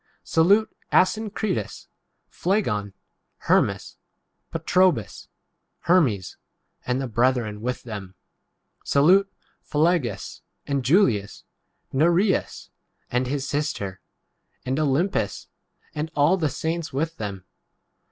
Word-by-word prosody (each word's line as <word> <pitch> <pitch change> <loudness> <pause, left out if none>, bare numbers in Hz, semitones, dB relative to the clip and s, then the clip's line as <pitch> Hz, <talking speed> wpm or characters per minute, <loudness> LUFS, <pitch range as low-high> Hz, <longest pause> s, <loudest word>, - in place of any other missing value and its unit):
14 - - -49
Salute 200 +7 +3 0.2
Asyncritus, 205 - 0 0.4
Phlegon, 105 - -1 0.4
Her - - +4
nias, - - -4 0.5
Patrobas, 180 - +1 0.5
Hermes, 135 - +2 0.5
and 125 +1 0
the 135 - -2
15 120 - -9
brethren 120 -3 +1
with 125 +2 -3
them. 100 -5 -8 0.7
Salute 185 +8 +4 0.3
Phi 145 - -6
lologus, 150 - 0 0.2
and 140 -2 -1
Julias, 125 - +2 0.5
Nereus, 175 +7 +1 0.4
and 125 +1 0
his 140 +1 -2
sister, 120 -11 -3 0.6
and 130 +3 -1
Olympas, 155 +6 0 0.5
and 155 0 -3
all 145 +4 +4
16 - - -6
the 155 -3 +1
saints 165 +3 -3
with 160 +4 -2
them. 100 -3 -6
145 Hz, 105 wpm, -24 LUFS, 115-175 Hz, 0.7 s, Her